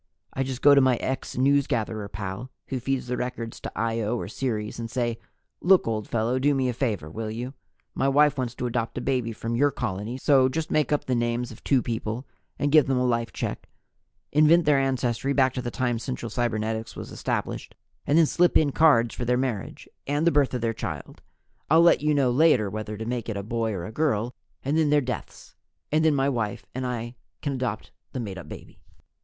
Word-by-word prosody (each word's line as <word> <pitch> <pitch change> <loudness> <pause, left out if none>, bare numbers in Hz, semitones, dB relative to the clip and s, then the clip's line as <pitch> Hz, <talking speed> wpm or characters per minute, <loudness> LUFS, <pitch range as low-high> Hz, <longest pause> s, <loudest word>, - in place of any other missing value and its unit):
"I 135 - -2
just 130 -1 -3
go 145 - +8
to 140 - +6
my 130 -1 +4
ex 130 +3 -3
newsgatherer 120 -6 +1
pal 100 +5 -5 0.2
who 130 - -2
feeds 135 +1 -1
the 125 0 -2
records 125 -2 -4
to - - -6
Io 115 0 -1
or - - -4
Ceres 110 -5 -3
and 115 -1 -4
say, 120 -2 -1 0.4
'Look, 185 -4 +5
old 110 -2 -2
fellow, 115 +3 0
do 145 +2 +3
me 130 -1 +1
a - - -1
favor, 110 - -2
will 110 +7 -5
you? 120 +4 -5 0.4
My 135 - 0
wife 150 +1 +4
wants 125 -2 -3
to - - -3
adopt 120 -1 -2
a - - +1
baby 125 -3 0
from 115 +1 -4
your 145 +4 +4
colony, 105 0 -4
so 135 -1 +4
just 160 +3 -3
make 155 0 +2
up 150 - +1
the 130 - 0
names 120 0 -1
of 110 - -13
two 135 -3 +2
people 115 +2 -3 0.3
and 145 0 0
give 155 -2 +6
them 135 -1 +1
a 125 - +2
life 115 -1 0
check, - - -5 0.6
invent 155 +3 +5
their 150 -2 +4
ancestors 135 0 0
back 130 -2 +3
to 125 - -3
the 120 - -3
time 120 -1 -1
Central 120 -1 -5
Cybernetics 110 -2 -2
was - - -7
established, - - -3 0.3
and 145 +2 +4
then 165 - +7
slip 175 +3 +3
in 150 -3 +2
cards 125 -7 +4
for - - -4
their 125 +1 +2
marriage, 125 -6 -3 0.2
and 145 +3 0
the 170 - +5
birth 140 -3 +2
of 125 - -2
their 115 -1 0
child - - -6 0.5
I'll 160 +3 +6
let 170 - +5
you 150 0 +2
know 135 -3 +3
later 125 -7 +4
whether 110 0 -5
to 110 - -5
make 120 -1 -3
it 105 - -3
a 100 - -4
boy 115 +1 -1
or 90 -4 -4
a 110 - -7
girl 120 -4 0 0.3
and 145 +4 +1
then 155 -2 +3
their 150 0 +5
deaths; 125 -5 -6 0.4
and 155 +1 +3
then 155 -2 +4
my 135 0 +2
wife 115 -6 -2
and 130 0 -3
I 120 -1 -4 0.3
can 145 - -1
adopt 125 -5 -3 0.2
that 130 - -3
made 100 -4 -5
up - - -11
baby.' - - -11
125 Hz, 220 wpm, -26 LUFS, 115-140 Hz, 0.6 s, go